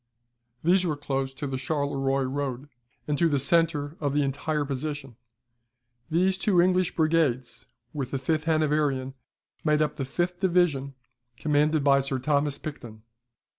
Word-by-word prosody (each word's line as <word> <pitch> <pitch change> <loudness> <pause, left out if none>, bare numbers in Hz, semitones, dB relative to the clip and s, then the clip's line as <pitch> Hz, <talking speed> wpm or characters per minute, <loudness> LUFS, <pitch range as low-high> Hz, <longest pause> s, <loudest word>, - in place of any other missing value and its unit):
These 180 +3 +4
were 155 -5 -1
close 135 -2 -2
to 145 - -5
the 135 -2 -3
Charleroi 135 -1 0
road, 135 0 -3 0.4
and 150 -1 -1
to 170 - +4
the 145 - +2
centre 150 +1 +1
of 145 -2 -1
the 145 - +3
entire 145 +2 -1
position. 135 -2 -4 0.9
These 185 +3 +2
two 190 -3 +2
English 180 0 +2
brigades, 135 -8 0 0.3
with 140 -4 -3
the 135 - -2
fifth 155 +3 -1
Hanoverian, 150 -4 +1 0.5
made 150 -1 +3
up 150 0 -3
the 135 - -2
fifth 175 +6 -2
division, 170 -8 +1 0.4
commanded 150 +1 +2
by 140 -1 +5
Sir 135 -1 -2
Thomas 145 +2 0
Picton. 115 -8 -8
145 Hz, 145 wpm, -26 LUFS, 135-160 Hz, 0.9 s, by